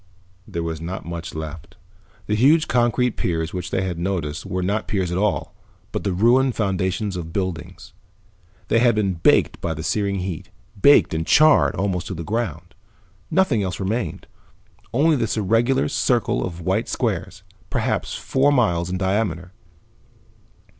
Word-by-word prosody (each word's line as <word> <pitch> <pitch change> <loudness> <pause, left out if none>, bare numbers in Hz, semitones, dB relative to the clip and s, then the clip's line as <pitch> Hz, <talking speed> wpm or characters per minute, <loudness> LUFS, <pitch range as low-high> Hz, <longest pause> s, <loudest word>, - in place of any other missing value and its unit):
There 85 - -4
was 80 -1 -4
not 90 +3 -5
much 85 +1 -6
left. 80 +1 -7 0.5
The 105 - -2
huge 145 +9 +4
concrete 120 0 +1
piers 80 -1 -2
which 90 -1 -4
they 95 - -1
had 90 -3 -3
noticed 85 -3 -3
were 90 0 -2
not 100 +4 -1
piers 95 -4 -1
at 90 - -1
all, 105 0 -1 0.4
but - - -3
the 100 - 0
ruined 120 +7 +3
foundations 95 0 -1
of 85 -2 -5
buildings. 95 -3 -5 0.8
They 115 - +4
had 120 -1 +4
been 100 -3 +1
baked 80 -2 +2
by 80 -1 -2
the 80 - -6
searing 100 +2 0
heat, 90 -4 -5 0.3
baked 145 - +6
and 80 0 -1
charred 155 0 +5
almost 95 -3 -1
to 95 - -5
the 85 - -5
ground. 85 -4 -3 0.6
Nothing 155 - +2
else 90 -3 -3
remained, 110 +5 -2 0.7
only 150 +6 +3
this 115 -4 -1
irregular 115 - +2
circle - - +1
of 85 -1 -5
white 95 +6 -1
squares, - - -2 0.3
perhaps - - -1
four 135 +2 +1
miles 90 -10 +2
in 95 - -2
diameter. 95 -2 -1
95 Hz, 155 wpm, -22 LUFS, 85-115 Hz, 0.8 s, baked